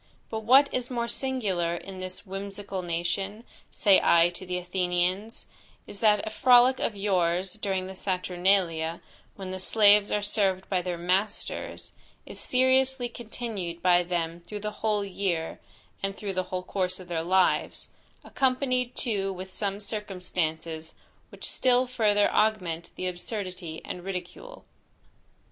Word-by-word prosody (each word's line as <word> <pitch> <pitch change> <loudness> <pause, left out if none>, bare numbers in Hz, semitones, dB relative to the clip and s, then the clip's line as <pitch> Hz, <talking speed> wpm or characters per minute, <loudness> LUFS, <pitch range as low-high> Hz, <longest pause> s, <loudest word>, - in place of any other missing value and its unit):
"But 220 - -2
what 260 +6 +6
is 250 -1 -1
more 235 -2 -2
singular 205 -11 0
in 190 +2 -8
this 185 +3 -4
whimsical 195 0 -5
nation, 175 +5 -3 0.3
say 200 -3 +4
I 170 0 +5
to 180 +1 -9
the 180 0 -2
Athenians, 180 +4 -1 0.4
is, 200 - -8
that 210 -2 +3
a 215 - -4
frolic 250 +2 +5
of 215 - -1
yours 185 -2 0
during 195 -3 -2
the 190 - -7
Saturnalia, 180 -3 0 0.4
when 190 -2 -7
the 185 - -5
slaves 205 +1 +5
are 210 - 0
served 195 -2 +2
by 185 -2 +1
their 175 -1 -3
masters, 190 +5 -2 0.3
is - - -6
seriously 260 0 +2
continued 215 -7 -5
by 180 -1 +5
them 170 -1 -2
through 210 +4 -8
the 210 0 -3
whole 210 -2 +1
year, 180 -4 -2 0.4
and 195 0 -2
through 200 -2 -4
the 185 0 -1
whole 185 -1 -4
course 185 -1 -1
of 185 - -11
their 170 -2 -2
lives; 185 +2 +1 0.3
accompanied 255 -1 0
too 195 -4 0
with 190 0 -7
some 200 +1 -2
circumstances, 175 -6 -3 0.3
which - - -9
still 255 0 +3
further 215 -5 +2
augment 180 -6 0
the 185 - -4
absurdity 180 -2 -4
and 180 - -6
ridicule. 195 - -7
195 Hz, 145 wpm, -27 LUFS, 180-215 Hz, 0.4 s, what